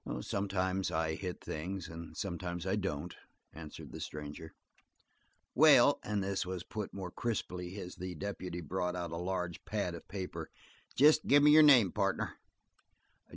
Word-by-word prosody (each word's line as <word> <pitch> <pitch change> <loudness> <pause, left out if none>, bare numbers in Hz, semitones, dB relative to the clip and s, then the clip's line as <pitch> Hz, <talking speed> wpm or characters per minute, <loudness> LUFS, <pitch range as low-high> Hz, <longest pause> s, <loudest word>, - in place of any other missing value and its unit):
"Sometimes 95 +1 -1
I 80 -1 0
hit 90 +2 -5
things 90 +3 -4
and 85 0 -9
sometimes 90 -2 -4
I 95 - +1
don't," 90 -5 -3 0.4
answered 75 0 -9
the - - -8
stranger. 75 +2 -7 1.0
"Well," - - +7
and 105 -1 -1
this 95 0 -1
was 90 -1 -5
put 105 0 -5
more 95 -2 -6
crisply 90 -5 -3
as 90 -2 -8
the 90 0 -5
deputy 90 -1 -5
brought 90 +3 -2
out 85 -2 -4
a 85 - -4
large 90 -1 -3
pad 100 -4 -2
of 85 - -9
paper, 95 -2 -5 0.5
"jest 150 +3 +5
gimme 145 +1 +7
your 155 +1 +9
name, 125 - +7
partner." - - -1
90 Hz, 150 wpm, -33 LUFS, 85-100 Hz, 1.0 s, your